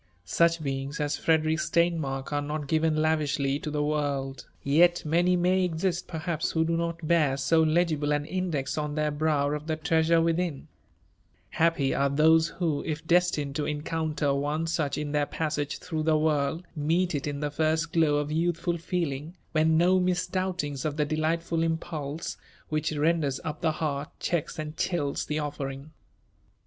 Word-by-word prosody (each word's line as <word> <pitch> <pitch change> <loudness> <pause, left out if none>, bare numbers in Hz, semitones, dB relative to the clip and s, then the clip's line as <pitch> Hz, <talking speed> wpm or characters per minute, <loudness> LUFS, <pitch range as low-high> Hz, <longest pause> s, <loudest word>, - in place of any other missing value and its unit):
Such 165 - +2
beings 135 +2 -3
«s 150 -1 0
Ff«derick 160 -1 +2
Steinmark: 155 -6 0
are 145 - +1
not 150 +1 -3
given 160 +2 +1
lavishly 145 -3 +1
to 150 - -5
tb^ 150 0 0
world; 140 -3 -2 0.2
y^t 175 +5 +4
many 175 +3 +3
AMty 180 0 +2
^xiat, 175 +1 -1
perhdps, 160 -1 -2
who 160 0 +2
4o - - -3
not 170 0 -2
hoar 170 +1 +3
ao - - 0
togihio 155 0 +2
an 145 0 -2
ii^% 160 -5 -2
on 150 0 -4
tWr 150 -1 -1
hr<9w 150 -2 +1
of 150 0 -6
0^ 155 -1 -2
U09mr» 165 0 +3
within* 165 -3 -1 0.8
Happy 160 -5 +2
aro 140 0 0
thpee 160 +1 +5
who, 160 -5 -1
if 155 0 -4
deitined 170 -5 +2
to 150 0 -2
onoountar 150 -1 -1
one 145 +3 -1
such 160 -3 -1
in 150 -1 -3
their 145 -1 +1
passage 150 -2 -2
through 160 -3 -4
the 155 0 +3
world, 155 +2 0
meet 165 +4 +1
it 145 0 -2
in 145 -1 -3
the 150 0 -2
first 160 +2 0
glow 150 -3 +3
i4 150 +1 -4 0.2
yoothfol 170 0 -2
feeling, 165 -2 -3 0.2
when 160 0 +3
no 180 +3 +4
mis4ouhtiags 180 -5 -1
of 150 -2 -2
tbo 150 -1 +1
delightfiil 165 +2 0
impulse, 160 -2 -3 0.3
which 155 0 0
reodarK 150 -2 +1
up 155 +1 -5
the 160 -3 +2
heart 150 -2 -2
checks 170 -4 -2
mA 155 - -3
chills 155 -5 -1
the 150 - -1
ofl^riqg 145 -1 -4
155 Hz, 165 wpm, -27 LUFS, 145-165 Hz, 0.8 s, thpee